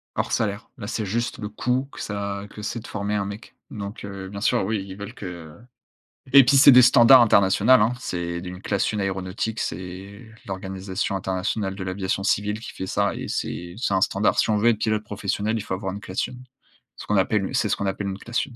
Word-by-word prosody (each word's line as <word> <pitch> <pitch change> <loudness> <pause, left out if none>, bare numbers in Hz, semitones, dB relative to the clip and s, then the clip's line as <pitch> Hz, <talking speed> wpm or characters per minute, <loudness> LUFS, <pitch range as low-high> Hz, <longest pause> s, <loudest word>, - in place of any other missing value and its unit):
Hors - - -1
salaire. 105 -1 -1
Là, 105 -4 -7
c'est 110 -1 -2
juste 115 +5 -2
le 105 -2 -4
coût 125 +5 -1
que - - -9
ça 100 -1 -4
que 105 - -10
c'est 110 +3 -3
de 115 - -11
former 105 0 -3
un 100 -1 0
mec 100 +3 -9
donc 100 +1 -7
heu, 100 -1 -7
bien 100 +1 -7
sûr, 95 - +2
oui, 105 -1 -1
ils 95 0 -9
veulent 100 +2 -7
que 85 -7 -8 0.8
et 140 -1 +10
puis 140 +2 +5
c'est 140 +1 +9
des 125 0 +9
standards 125 +1 +8
international, 105 +3 +5
hein. 110 +3 +3
C'est 85 -6 -3
d 90 - -8
une 90 +1 -9
classe 100 -1 0
1 105 - -1
aéronautique, 95 +3 -3
c'est 95 +5 -6 0.2
l'organisation 95 +1 -4
internationale 95 +1 -2
de 95 - -6
l'aviation 95 +1 -2
civile 105 +1 0
qui 115 - -8
fait 95 - -5
ça - - 0
et - - -5
c'est 85 0 -4
c'est 115 -4 -1
un 95 - +2
standard. 100 +2 +2
Si - - +2
on 105 - +3
veut 115 +3 +4
être 115 - +2
pilote 110 -1 0
professionnel, 105 +1 -2
il - - -3
faut 100 - -5
avoir 95 0 -3
une 100 - -6
classe 95 -1 -2
1. 125 0 -11 0.6
Ce - - -9
qu'on 105 - +1
appelle 95 0 +1
c'est - - +2
ce - - +2
qu'on 100 - -3
appelle 100 +1 -2
une 95 -1 -4
classe 120 +4 -2
1. 130 - -14
100 Hz, 235 wpm, -24 LUFS, 95-110 Hz, 0.8 s, et